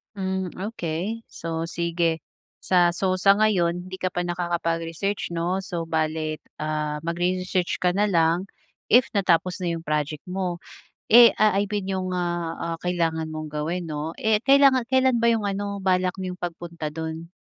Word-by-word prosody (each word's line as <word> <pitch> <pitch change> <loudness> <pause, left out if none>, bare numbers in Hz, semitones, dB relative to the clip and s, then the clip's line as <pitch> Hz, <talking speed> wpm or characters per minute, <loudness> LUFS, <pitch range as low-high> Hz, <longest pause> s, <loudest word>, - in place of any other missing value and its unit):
Hmm, 190 -2 -2
okey. 205 +1 -4
So 165 0 -4
sige, 170 -1 -1 0.4
sa 175 -2 +3
so 185 0 0
sa 195 +2 +6
ngayon 180 -5 +2
hindi 185 - -6
ka 185 -1 -2
pa 175 - 0
nakakapag-research 170 +1 -2
'no. 175 +3 0
So 170 -3 -4
bale, 155 -1 -1 0.2
ah, 150 -1 -2
magre-research 180 +2 -1
ka 180 - +3
na 210 - +4
lang 170 -1 +2 0.5
if 255 +2 +6
natapos 185 -1 +2
na 175 -3 -2
'yong 165 - -4
project 150 -1 -2
mo, 180 -2 -3 0.5
eh, 235 -1 +10
ah, 215 -2 +4
I 200 0 0
mean 195 -2 -2
'yong, 185 -1 -2
ah, 175 -2 -2 0.2
ah, - - -5
kailangan 165 -3 -1
mong 155 -1 -6
gawin 165 +4 -2
'no. 155 +1 -5
Eh, 220 -1 +2
kailangan 270 -2 +5
kailan 260 -3 +3
ba 235 - +4
'yong 225 -3 +1
ano, 200 0 -2
balak 185 -1 +1
niyong 185 -1 -5
pagpunta 170 -2 -5
do'n? 160 +1 -6
175 Hz, 160 wpm, -24 LUFS, 165-195 Hz, 0.5 s, eh